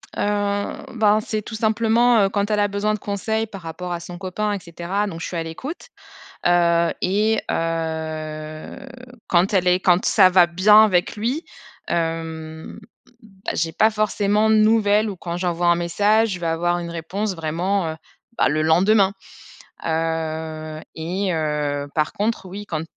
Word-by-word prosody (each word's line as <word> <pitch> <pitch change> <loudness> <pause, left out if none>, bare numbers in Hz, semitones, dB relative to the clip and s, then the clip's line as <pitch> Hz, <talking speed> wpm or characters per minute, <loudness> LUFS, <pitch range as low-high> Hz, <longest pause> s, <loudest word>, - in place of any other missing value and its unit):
Heu, - - -2 0.7
bah, 215 -1 +4
c'est 215 -1 -2
tout 220 +2 -8
simplement, 225 +1 +3
heu, 195 - 0
quand 205 +1 -1
elle 210 - +2
a 205 - +3
besoin 200 +1 -1
de 215 - -3
conseils 220 +3 -2
par 195 -3 -10
rapport 165 +2 -6
à 170 - -3
son 175 +1 -9
copain 205 +2 -2
et 200 - -3
cetera. 180 +3 -3
Donc 165 -3 -7
je - - -3
suis 175 - -5
à 165 - -1
l'écoute. 260 - -7 0.6
Heu, 170 -1 +3
et 210 +4 +1
heu, 160 0 -4 0.4
quand 185 +3 +2
elle 180 -1 +3
est 180 +1 +3
quand 180 -1 +3
ça 190 -4 +6
va 180 -1 +5
bien 205 +5 +6
avec 180 0 +1
lui, 245 +10 -2 0.4
hem 160 -1 -4 0.4
bah, 200 -1 -7
j'ai 165 0 -1
pas 215 +6 +3
forcément 210 0 +1
de 220 - +5
nouvelles 215 -1 +3
ou 195 - -7
quand 170 -1 -5
j'envoie 175 -1 -1
un 170 - +5
message, 205 +6 +2
je 180 -2 -4
vais 170 - -2
avoir 175 +2 0
une 170 -1 -6
réponse 185 +5 -3
vraiment, 165 +2 -1
heu 160 - -9 0.4
bah, - - +4
le 155 +1 0
lendemain. 190 +5 +4 0.7
Heu 160 -1 -3
et 180 +3 -2
heu 150 -2 -1
par 155 -1 0
contre, 210 -2 -2
oui, 200 +3 -7
quand 160 -4 -3
180 Hz, 170 wpm, -22 LUFS, 165-210 Hz, 0.7 s, ça